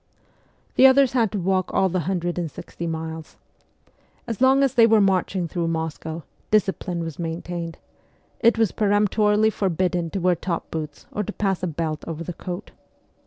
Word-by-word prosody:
The 265 - +9
others 265 -1 +5
had 230 -6 +2
to 210 - -2
walk 185 0 0
all 190 - +3
the 185 0 -1
hundred 175 -2 -1
and 170 -2 -2
sixty 170 +4 -7
miles. 160 0 -5 0.9
As 230 0 -5
long 265 +1 +5
as 270 - +2
they 230 -2 +6
were 220 -1 +5
marching 190 -2 +1
through 170 0 -2
Moscow, 160 0 -3 0.3
discipline 190 -4 0
was 165 -1 -6
maintained: 170 0 -4 0.6
it 230 0 +4
was 225 -4 +2
peremptorily 210 +1 +2
forbidden 180 -3 0
to 195 - -3
wear 180 0 +3
top 170 0 -4
boots 155 -2 -5
or 210 - -2
to 210 - -4
pass 195 -3 -1
a 185 - -1
belt 155 -1 -3
over 165 0 -4
the 175 - -5
coat. 180 +4 -7
180 Hz, 170 wpm, -23 LUFS, 165-210 Hz, 0.9 s, The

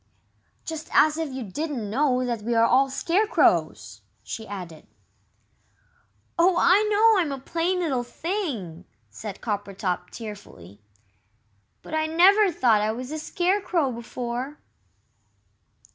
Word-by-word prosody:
"Just 320 -1 -6
as 305 0 +5
if 320 -2 -3
you 260 -1 -5
didn't 250 - -4
know 255 +3 +1
that 235 -3 -2
we 235 +2 -1
are 230 0 +5
all 265 +3 +3
Scarecrows!" 350 +10 +1 0.2
she 220 -2 -7
added. 180 -6 -8 1.5
"Oh, 355 +2 +5
I 370 +4 +5
know 430 0 +5
I'm 315 -4 -2
a 275 - -4
plain 350 +4 -1
little 275 -8 0
thing!" 240 - -4 0.3
said 210 -3 -8
Coppertop, 195 -4 -3
tearfully, 150 - -10 1.0
"but - - -10
I 315 0 +1
never 380 +5 +5
thought 235 -8 +3
I 215 +1 +1
was 250 +4 -6
a 310 - -4
Scarecrow 355 -3 0
before." 245 +4 -5
265 Hz, 125 wpm, -25 LUFS, 215-330 Hz, 1.5 s, as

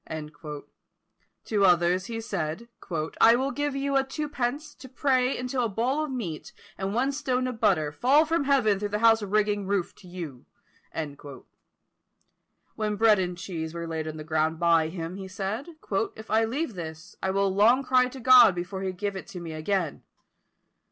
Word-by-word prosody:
To 210 -3 +1
others 180 +1 +3
he 230 -1 -4
said, 195 0 -4 0.5
"I 230 +1 +7
will 265 +3 0
give 290 -1 -2
you 275 0 -1
a 270 - +4
two 300 +3 -4
pence, 290 +2 -3
to 260 - -13
pray 260 -1 +1
until 250 0 -2
a 230 - 0
boll 250 +9 0
of - - -7
meal, 205 - -4 0.3
and 195 +2 -3
one 260 +4 +2
stone 260 -3 -1
of 250 -3 -4
butter, 155 -7 +2
fall 270 - +4
from 320 -2 0
heaven 240 -8 +3
through 205 0 -2
the 210 - -1
house 225 -1 +6
rigging 205 -1 0
(roof) 195 -3 -1
to 185 - -15
you." 165 -8 -8 2.3
When 210 -1 -2
bread 215 -1 +5
and 180 -1 -2
cheese 165 -3 -5
were 170 0 -4
laid 160 -1 -4
on 155 0 -5
the 155 - -6
ground 160 +1 0
by 165 -2 +4
him, 165 +2 -6
he 190 -1 -7
said, 195 - -4 0.5
"If 220 0 -10
I 220 +1 +4
leave 260 +3 -2
this, 165 +1 -8
I 190 - -1
will 195 0 +1
long 230 +7 +4
cry 255 -1 +3
to 260 +1 -9
God 250 -5 +7
before 185 +2 -4
he 190 -1 -2
give 200 +2 -4
it 190 +2 -8
me 170 -2 -6
again." 165 0 -2
210 Hz, 180 wpm, -27 LUFS, 180-255 Hz, 2.3 s, I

